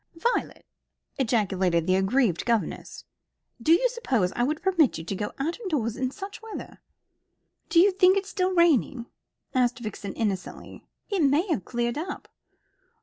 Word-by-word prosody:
"Violet!" 470 Hz, +9 st, -2 dB, 0.5 s
ejaculated 190 Hz, -9 st, +1 dB
the 185 Hz, -, +2 dB
aggrieved 195 Hz, -1 st, +2 dB
governess. 230 Hz, -2 st, -2 dB, 0.6 s
"Do 310 Hz, -, +2 dB
you 355 Hz, +10 st, +5 dB
suppose 260 Hz, -, 0 dB
I -, -, -1 dB
would 300 Hz, +6 st, -1 dB
permit 345 Hz, -8 st, +3 dB
you 160 Hz, -, -6 dB
to 195 Hz, -, -4 dB
go 205 Hz, +2 st, -3 dB
out 320 Hz, -, -2 dB
of 425 Hz, -5 st, -5 dB
doors 235 Hz, -8 st, -1 dB
in 255 Hz, +1 st, -1 dB
such 395 Hz, +8 st, -8 dB
weather?" 445 Hz, -1 st, -9 dB, 0.9 s
"Do 335 Hz, -, +4 dB
you 395 Hz, +3 st, +6 dB
think 375 Hz, 0 st, +4 dB
it's 390 Hz, 0 st, -2 dB
still 375 Hz, -2 st, 0 dB
raining?" 290 Hz, -7 st, +3 dB, 0.5 s
asked 250 Hz, -1 st, +2 dB
Vixen 210 Hz, -4 st, -6 dB
innocently. 200 Hz, -5 st, -4 dB, 0.2 s
"It 390 Hz, -3 st, +1 dB
may 295 Hz, +6 st, +3 dB
have 250 Hz, -, -1 dB
cleared 240 Hz, +2 st, -2 dB
up. 370 Hz, +4 st, -6 dB
265 Hz, 155 wpm, -26 LUFS, 215-365 Hz, 0.9 s, you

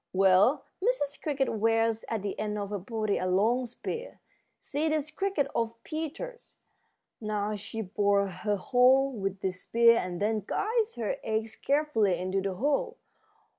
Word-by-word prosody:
Well, 195 Hz, +7 st, +4 dB, 0.2 s
Mrs. 405 Hz, -, 0 dB
Cricket 280 Hz, -3 st, 0 dB
wears 225 Hz, +1 st, +1 dB
at 220 Hz, -3 st, -2 dB
the 200 Hz, -, -4 dB
end 210 Hz, 0 st, -2 dB
of 205 Hz, -1 st, -4 dB
her 205 Hz, -, -2 dB
body 215 Hz, +1 st, -1 dB
a 185 Hz, -, -1 dB
long 225 Hz, +7 st, +2 dB
spear. 460 Hz, -, -6 dB, 0.4 s
See 305 Hz, +2 st, -2 dB
this 310 Hz, -1 st, -1 dB
cricket 390 Hz, -7 st, 0 dB
of 230 Hz, 0 st, -1 dB
Peter's. 325 Hz, -, -6 dB, 0.7 s
Now 210 Hz, -1 st, -1 dB
she 215 Hz, +2 st, -5 dB
bores 200 Hz, 0 st, +1 dB
her 210 Hz, -1 st, +1 dB
hole 260 Hz, +5 st, +4 dB
with 195 Hz, -3 st, -3 dB
this 185 Hz, -1 st, -3 dB
spear 230 Hz, 0 st, +5 dB
and 180 Hz, -1 st, -4 dB
then 215 Hz, +1 st, +1 dB
guides 445 Hz, +1 st, 0 dB
her 225 Hz, -4 st, -2 dB
eggs 220 Hz, 0 st, -2 dB
carefully 275 Hz, -, +1 dB
into 185 Hz, +2 st, -1 dB
the 190 Hz, -1 st, -2 dB
hole. 375 Hz, -, 0 dB
225 Hz, 155 wpm, -29 LUFS, 200-285 Hz, 0.7 s, spear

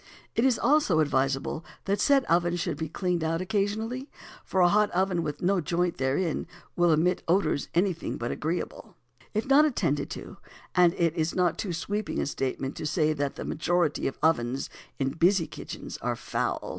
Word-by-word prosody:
It 230 Hz, -, +3 dB
is 260 Hz, -3 st, +3 dB
also 290 Hz, -, +3 dB
advisable 135 Hz, +1 st, 0 dB, 0.2 s
that 200 Hz, +1 st, 0 dB
said 275 Hz, -2 st, +4 dB
oven 175 Hz, +1 st, +2 dB
should 170 Hz, -4 st, -2 dB
be 160 Hz, +1 st, -4 dB
cleaned 175 Hz, 0 st, -1 dB
out 165 Hz, +1 st, 0 dB
occasionally; 220 Hz, +7 st, -2 dB, 0.3 s
for 190 Hz, -, -1 dB
a 175 Hz, -, +7 dB
hot 210 Hz, +3 st, +3 dB
oven 185 Hz, -1 st, +1 dB
with 150 Hz, -1 st, -4 dB
no 190 Hz, 0 st, +2 dB
joint 170 Hz, +3 st, 0 dB
therein 140 Hz, +6 st, 0 dB, 0.3 s
will 175 Hz, -1 st, +4 dB
emit 170 Hz, +4 st, +2 dB
odours 175 Hz, -4 st, +1 dB
anything 175 Hz, -1 st, 0 dB
but 120 Hz, -, -3 dB
agreeable, 165 Hz, +3 st, -4 dB, 0.4 s
if 215 Hz, -, 0 dB
not 275 Hz, +3 st, +6 dB
attended 170 Hz, -, 0 dB
to; -, -, -8 dB, 0.4 s
and 175 Hz, -2 st, +4 dB
it 165 Hz, -2 st, +1 dB
is 160 Hz, 0 st, -1 dB
not 180 Hz, -2 st, +1 dB
too 195 Hz, -, -2 dB
sweeping 205 Hz, +5 st, -3 dB
a -, -, 0 dB
statement 135 Hz, -1 st, -3 dB
to 155 Hz, -, -3 dB
say 155 Hz, 0 st, +2 dB
that 140 Hz, -2 st, -2 dB
the -, -, -6 dB
majority 170 Hz, -1 st, 0 dB
of 135 Hz, -, -4 dB
ovens 135 Hz, -5 st, +1 dB, 0.3 s
in 135 Hz, -1 st, 0 dB
busy 170 Hz, +3 st, +3 dB
kitchens -, -, -8 dB
are -, -, -1 dB
foul. -, -, -2 dB
175 Hz, 180 wpm, -27 LUFS, 155-195 Hz, 0.4 s, a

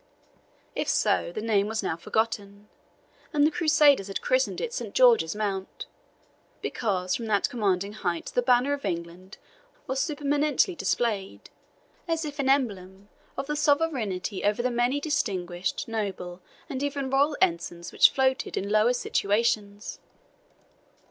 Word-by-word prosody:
If -, -, -1 dB
so, -, -, +1 dB
the 215 Hz, +4 st, -5 dB
name 210 Hz, -3 st, +2 dB
was 220 Hz, -1 st, -2 dB
now 175 Hz, -, -1 dB
forgotten, 205 Hz, +2 st, -3 dB, 0.6 s
and 290 Hz, -1 st, +4 dB
the 310 Hz, -, +3 dB
Crusaders 300 Hz, -, +4 dB
had 195 Hz, -, -3 dB
christened -, -, +1 dB
it 485 Hz, -1 st, -3 dB
Saint -, -, -5 dB
George's 485 Hz, -, +5 dB
Mount, 195 Hz, -3 st, -3 dB, 0.7 s
because 185 Hz, -5 st, -2 dB
from 230 Hz, -, -3 dB
that 205 Hz, -2 st, +2 dB
commanding 200 Hz, -3 st, 0 dB
height 175 Hz, -6 st, -3 dB
the 245 Hz, -, +2 dB
banner 250 Hz, +3 st, +3 dB
of 285 Hz, -, -4 dB
England 175 Hz, +1 st, -5 dB, 0.5 s
was 265 Hz, 0 st, -2 dB
supereminently 290 Hz, +3 st, +1 dB
displayed, 215 Hz, -, -2 dB, 0.6 s
as 330 Hz, -1 st, -1 dB
if 295 Hz, -1 st, -7 dB
an 270 Hz, -1 st, +1 dB
emblem 200 Hz, -7 st, -1 dB, 0.3 s
of -, -, -2 dB
sovereignty 285 Hz, -, 0 dB
over 210 Hz, +3 st, +1 dB
the 255 Hz, -, +1 dB
many 245 Hz, +4 st, +1 dB
distinguished, 190 Hz, -, -2 dB
noble, 195 Hz, -5 st, -4 dB, 0.3 s
and 265 Hz, -2 st, -4 dB
even 280 Hz, -2 st, -2 dB
royal 285 Hz, +2 st, +2 dB
ensigns, 170 Hz, 0 st, -1 dB
which -, -, +7 dB
floated 265 Hz, 0 st, 0 dB
in 200 Hz, +2 st, -2 dB
lower 215 Hz, +3 st, +4 dB
situations. 205 Hz, -2 st, -1 dB
225 Hz, 135 wpm, -27 LUFS, 195-285 Hz, 0.7 s, which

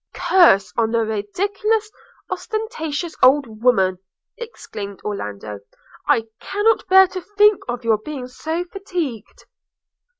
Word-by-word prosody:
'Curse 200 Hz, -, +4 dB
on 225 Hz, -1 st, +2 dB
the 230 Hz, -1 st, +1 dB
ridiculous, 400 Hz, -, -1 dB, 0.4 s
ostentatious 400 Hz, -8 st, -4 dB
old 255 Hz, -5 st, +3 dB
woman!' 190 Hz, -7 st, +3 dB, 0.4 s
exclaimed 210 Hz, -, -8 dB
Orlando. 105 Hz, -, -5 dB, 0.5 s
'I 225 Hz, -, +3 dB, 0.2 s
cannot 415 Hz, +2 st, +1 dB
bear 380 Hz, 0 st, +8 dB
to 370 Hz, -1 st, -6 dB
think 415 Hz, +1 st, +3 dB
of 240 Hz, 0 st, -4 dB
your 225 Hz, -2 st, +2 dB
being 265 Hz, +1 st, -7 dB
so 320 Hz, +7 st, -4 dB
fatigued!' 350 Hz, -, -6 dB
290 Hz, 110 wpm, -20 LUFS, -, 0.5 s, bear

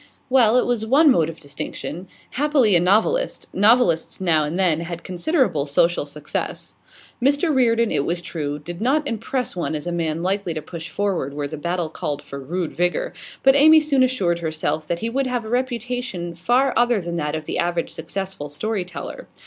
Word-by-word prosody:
Well, 245 Hz, -3 st, +5 dB
it -, -, +3 dB
was 240 Hz, -3 st, 0 dB
one 280 Hz, +7 st, +5 dB
mode 165 Hz, -9 st, +2 dB
of 165 Hz, -, -9 dB
distinction. 155 Hz, +4 st, -6 dB, 0.2 s
Happily, 275 Hz, -7 st, +3 dB
a -, -, +6 dB
novelist; 215 Hz, -, +1 dB
novelists 205 Hz, -6 st, +3 dB
now 165 Hz, -5 st, +2 dB
and 150 Hz, +4 st, -3 dB
then 175 Hz, -5 st, +3 dB
had 170 Hz, 0 st, -6 dB
considerable 185 Hz, -, 0 dB
social 150 Hz, +2 st, +2 dB
success. 150 Hz, +1 st, -5 dB, 0.5 s
Mr 285 Hz, +5 st, +2 dB
Reardon, 235 Hz, -3 st, +3 dB
it -, -, +1 dB
was 170 Hz, +4 st, -1 dB
true, 150 Hz, -4 st, -4 dB
did 170 Hz, +5 st, -8 dB
not 285 Hz, +5 st, +1 dB
impress 235 Hz, +1 st, -2 dB
one 170 Hz, -3 st, -2 dB
as 150 Hz, -, -4 dB
a 175 Hz, -, -2 dB
man 165 Hz, -1 st, -2 dB
likely 190 Hz, -2 st, -1 dB
to 155 Hz, -, -3 dB
push 165 Hz, 0 st, -7 dB
forward 185 Hz, -9 st, -2 dB
where 145 Hz, -1 st, -2 dB
the 155 Hz, -, -6 dB
battle 170 Hz, +2 st, -2 dB
called 145 Hz, -2 st, -4 dB
for 140 Hz, -1 st, -8 dB
rude 165 Hz, +5 st, -3 dB
vigour, 180 Hz, -, 0 dB, 0.3 s
but 270 Hz, 0 st, +6 dB
Amy 315 Hz, +3 st, +8 dB
soon 295 Hz, -3 st, +1 dB
assured 195 Hz, -10 st, +1 dB
herself 155 Hz, -1 st, -2 dB
that 170 Hz, +1 st, -2 dB
he 225 Hz, -, -1 dB
would 270 Hz, +2 st, 0 dB
have 245 Hz, -2 st, -2 dB
a -, -, -6 dB
reputation 245 Hz, -7 st, -2 dB
far 245 Hz, +10 st, +2 dB
other 240 Hz, -2 st, +3 dB
than 170 Hz, -2 st, -5 dB
that 150 Hz, -1 st, -2 dB
of 155 Hz, -1 st, -5 dB
the -, -, -3 dB
average 170 Hz, -1 st, -1 dB
successful 175 Hz, -2 st, -5 dB
storyteller. 180 Hz, +2 st, -5 dB
180 Hz, 190 wpm, -22 LUFS, 160-245 Hz, 0.5 s, Amy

